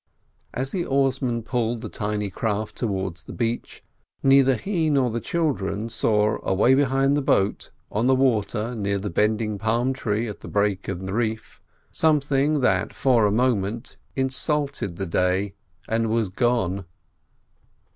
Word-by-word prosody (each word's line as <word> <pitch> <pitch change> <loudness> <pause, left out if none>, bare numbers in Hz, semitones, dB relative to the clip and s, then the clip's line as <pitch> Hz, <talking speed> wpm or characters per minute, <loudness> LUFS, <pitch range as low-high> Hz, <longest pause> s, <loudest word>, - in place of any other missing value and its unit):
As 130 +2 -3
the 180 - -1
oarsman 135 -4 0
pulled 120 -1 -1
the 115 - -5
tiny 105 -1 -3
craft 105 +1 -2
towards 95 -6 -3
the - - -8
beach, 115 -1 -3 0.4
neither 135 -1 +5
he 165 - -1
nor 135 -5 +2
the 115 +1 -3
children 115 - -1
saw 110 -1 +1
away 105 +7 +3
behind 135 0 +3
the 145 - +1
boat, 100 -7 +1 0.2
on 110 +4 +1
the 130 - +5
water 115 -3 +1
near 100 -3 -1
the 100 0 -4
bending 105 +2 0
palm 115 +4 +1
tree 115 -2 -1
at 105 - -7
the - - -10
break 100 -2 0
in 95 0 -4
the 95 - -4
reef, 110 -1 -3 0.3
something 145 -1 +2
that 100 -5 +1
for 120 -5 +3
a - - +1
moment 115 -1 0 0.2
insulted 135 - -1
the 95 - -3
day, 90 +3 0 0.3
and 115 0 0
was 110 -3 +1
gone. 100 -4 0
115 Hz, 150 wpm, -24 LUFS, 105-130 Hz, 0.4 s, neither